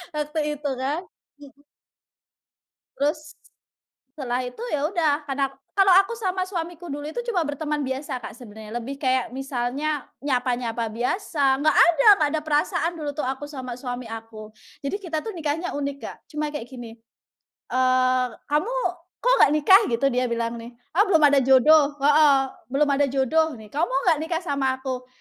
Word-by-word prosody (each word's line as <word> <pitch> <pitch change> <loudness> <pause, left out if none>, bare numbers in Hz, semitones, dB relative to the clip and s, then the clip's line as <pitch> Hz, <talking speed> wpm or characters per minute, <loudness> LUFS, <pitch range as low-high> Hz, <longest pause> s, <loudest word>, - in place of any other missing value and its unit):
waktu 300 +1 -2 0.2
itu 290 0 -4
kan, 285 +6 -1 0.4
mhm. 285 0 -16 1.4
Terus 305 +2 -2 0.8
setelah 255 -3 -3
itu 250 - -8
ya 295 -6 -1
udah 305 -4 +1
karena 275 -1 -1 0.2
kalau 390 -1 +3 0.2
aku 470 - -7
sama 370 -2 -1
suamiku 345 -3 -6
dulu 290 +1 -5
itu 480 +10 -5
cuma 345 -6 0
berteman 295 +1 -2
biasa 265 -1 -4
Kak 225 - -9
sebenarnya. 220 -2 -10
Lebih 270 +4 -5
kayak 255 -3 0
misalnya 270 +2 -2 0.2
nyapa-nyapa 245 -4 -1
biasa. 270 - 0
Nggak 310 +1 +4 0.2
ada 325 -1 +2
nggak 295 - +2
ada - - -1
perasaan 310 +2 0
dulu 295 -2 -3
tuh 300 - -2
aku 265 +3 -4
sama 260 -4 -7
suami 250 -1 -5
aku. 220 -1 -9 0.3
Jadi 280 - -1
kita 325 -5 -4
tuh 445 - -4
nikahnya 330 0 -3
unik 280 -1 -3
Kak, - - -7
cuma 300 -1 -3
kayak 245 -5 -6
gini, 240 -4 -9 0.8
eee, 255 0 +2 0.2
"Kamu 375 +12 +1 0.5
kok - - +5
gak 275 - +6
nikah 380 +8 +6
gitu?" 235 +3 0
Dia 250 +1 +1
bilang 235 0 -2
nih, 235 +1 -11 0.2
"Oh - - +8
belum 325 -5 +4
ada 285 -1 +6
jodoh," 285 +3 +5
heeh. 290 -1 +5 0.3
"Belum 280 +4 +1
ada 285 0 +3
jodoh 275 +4 +1
nih, 215 -2 -13
kamu 305 +4 +1
mau 270 +2 0
nggak 310 - +1
nikah 330 0 -1
sama 275 -4 0
aku?" 260 -1 -5
280 Hz, 165 wpm, -24 LUFS, 255-310 Hz, 1.4 s, Oh